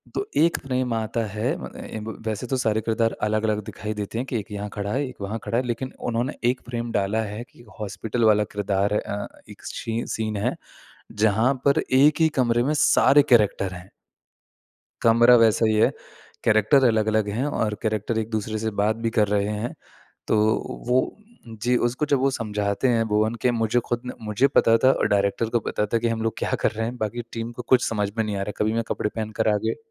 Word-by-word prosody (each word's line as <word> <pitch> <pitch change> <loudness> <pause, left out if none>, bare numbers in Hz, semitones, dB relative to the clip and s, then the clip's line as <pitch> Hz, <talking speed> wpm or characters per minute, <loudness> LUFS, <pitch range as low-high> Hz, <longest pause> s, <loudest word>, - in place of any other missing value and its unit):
तो 400 - -1
1 165 +1 +4
फ्रेम 130 -2 -1
आता 115 +1 -1
है 120 +9 0
म - - -6 0.2
एं 110 - -6
ब 110 - -6
वैसे 110 +3 -3
तो - - +2
सारे 110 -1 +1
किरदार 115 0 +1
अलग-अलग 110 0 0
दिखाई 110 +1 -5
देते 105 +2 -4
हैं 125 - -2
कि 120 - 0
एक 105 - -10
यहाँ 105 0 -4
खड़ा 100 0 -3
है 140 +3 0
एक 125 - -10
वहाँ 105 +3 -3
खड़ा 115 - -1
है 125 - +1
लेकिन 130 +2 -3 0.2
उन्होंने 120 +4 -1 0.2
1 130 - -8
फ्रेम 120 -1 -3
डाला 105 +1 0
है 105 +3 -6
कि - - -18 0.2
हॉस्पिटल 110 +3 -3
वाला 105 0 +3
किरदार 100 0 0
है 105 - +2
अ, 100 0 -4 0.2
एक - - -13
छीं 115 +1 -3
सीन 110 -1 -2
है - - -1 0.7
जहाँ 110 +5 +3
पर 140 0 +4 0.2
1 150 +3 +4
ही 160 - +5
कमरे 120 -1 +2
में 145 +4 +1
सारे 145 -1 +5
कैरेक्टर 105 -4 +3
हैं। 90 +1 -10 1.1
कमरा 120 +2 +6
वैसा 110 0 +4
ही 110 - +2
है, 105 - +4 0.5
कैरेक्टर 110 +5 +4
अलग-अलग 110 -2 +1
हैं 115 +7 -1
और 105 -2 0
कैरेक्टर 110 +1 -1
एक-दूसरे 110 0 -3
से 110 - +1
बात 110 +1 +2
भी - - +3
कर 105 - +4
रहे 100 0 +1
हैं। 105 +3 -3 0.5
तो 110 - +2 0.5
वो 125 +1 +4 0.6
जी 125 +1 +2
उसको 125 +5 -2
जब 145 -2 +2
वो 135 +1 +3
समझाते 105 -1 -1
हैं 115 -2 +2
भुवन 110 +2 +1
के 125 - +4
मुझे 115 0 +1
ख़ुद 120 -1 -1
ने 125 - -5
मुझे 105 +6 +2
पता 115 0 +5
था 130 - +7
और - - +1
डायरेक्टर 100 +3 +1
को - - +5
पता 105 - 0
था - - +5
कि - - +3
हम 115 -1 -2
लोग 115 -1 0
क्या - - -2
कर - - +3
रहे 115 0 -3
हैं 125 +1 -6
बाकी 115 +1 -3
टीम 115 0 -4
को 125 - -6
कुछ 125 - +4
समझ 105 -3 -1
में 110 - +2
नहीं 105 -1 -3
आ - - -2
रहा 100 - -3
है। - - -5
कभी 110 +1 +1
मैं 115 0 0
कपड़े 105 - -1
पहनकर 110 -1 -2
आ - - +2
गए 115 - 0
110 Hz, 220 wpm, -24 LUFS, 105-120 Hz, 1.1 s, था